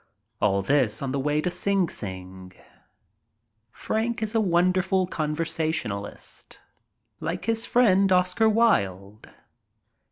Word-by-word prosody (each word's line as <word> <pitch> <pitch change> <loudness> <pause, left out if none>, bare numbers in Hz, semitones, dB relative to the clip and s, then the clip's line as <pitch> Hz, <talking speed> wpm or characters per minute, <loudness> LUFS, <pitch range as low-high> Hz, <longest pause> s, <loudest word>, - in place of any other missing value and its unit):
All 100 -1 +2
this 135 -2 +1
on 135 - -2
the 140 - -1
way 150 +2 0
to 180 - -2
Sing 195 -1 +1
Sing. 95 -4 -8 1.2
Frank 225 - -2
is 215 +1 -2
a 225 - +2
wonderful 185 0 +2
conversationalist. 155 - -3 0.6
Like 165 +3 -4
his 225 0 0
friend 195 -5 +3
Oscar 185 +4 +3
Wilde. 100 - 0
165 Hz, 105 wpm, -25 LUFS, -, 1.2 s, friend